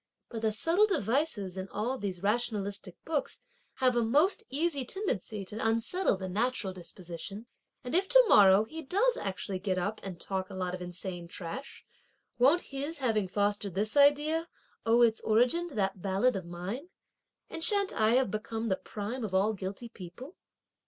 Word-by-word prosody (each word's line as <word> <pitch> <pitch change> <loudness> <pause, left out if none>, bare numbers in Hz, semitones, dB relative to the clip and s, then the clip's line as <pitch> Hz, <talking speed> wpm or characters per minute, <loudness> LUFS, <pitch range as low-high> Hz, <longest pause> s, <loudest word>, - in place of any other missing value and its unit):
But 225 -2 -5
the 220 -1 +2
subtle 335 - +3
devices 225 - 0
in 190 +1 -5
all 235 +5 -2
these 190 -3 -4
rationalistic 205 -3 -1
books 310 -3 -2 0.4
have 255 -1 +2
a 240 - +3
most 300 - +3
easy 290 -1 0
tendency 220 - -3
to 210 - -7
unsettle 230 - +1
the 190 0 -5
natural 210 0 -1
disposition, 180 +4 -8 0.4
and 250 - -5
if 380 +3 +2
to - - +8
morrow 195 - +7
he 315 +9 -7
does 420 - +2
actually 190 -1 -3
get 185 -1 -1
up, 205 +4 -2
and 185 -3 -7
talk 190 0 -3
a 195 - -8
lot 180 -1 -2
of 180 - -5
insane 175 0 -6
trash, 180 +11 -7 0.5
won't 285 +8 +5
his 280 +4 -5
having 225 -7 +1
fostered 205 0 0
this 215 +5 -1
idea 295 +3 +4 0.4
owe 235 +1 +5
its 225 -2 +3
origin 250 +11 +2
to 290 - -11
that 195 -2 -1
ballad 200 +6 +2
of 190 -3 -4
mine; 190 - -5 0.6
and 325 - -5
shan't 400 0 +2
I 220 +1 +3
have 255 -6 +2
become 220 +1 -3
the 190 - +1
prime 220 +7 -5
of 195 -3 -3
all 205 +3 +3
guilty 195 +4 -6
people?" 225 - -10
220 Hz, 170 wpm, -30 LUFS, 190-275 Hz, 0.6 s, to